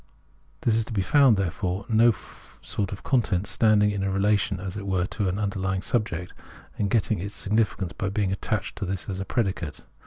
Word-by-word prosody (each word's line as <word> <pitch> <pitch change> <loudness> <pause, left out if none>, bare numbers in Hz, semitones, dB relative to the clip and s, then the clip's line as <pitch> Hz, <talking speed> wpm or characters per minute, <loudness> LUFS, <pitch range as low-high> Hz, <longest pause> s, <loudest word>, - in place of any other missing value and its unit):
There 115 - +2
is 115 0 +2
to 115 - -7
be 100 -3 +1
found, 135 +1 +5
therefore, 95 +1 -2
no 115 +1 +5 0.5
sort 100 -2 -2
of 100 - -7
content 105 -8 +1
standing 105 -1 +3
in 100 -1 -2
a 95 - 0
relation, 100 0 +1
as 95 0 -5
it 100 -1 -5
were, 95 -2 +1
to 100 0 -2
an 90 - -2
underlying 95 -2 -1
subject, 90 -7 -1 0.5
and 100 - +1
getting 110 -1 +1
its 100 +3 -5
significance 105 -4 0
by 95 - -2
being 100 -1 0
attached 105 +2 -2
to 100 - -2
this 95 -1 -4
as 95 -2 -4
a 95 - -3
predicate. 95 - -2
100 Hz, 195 wpm, -26 LUFS, 95-105 Hz, 0.5 s, found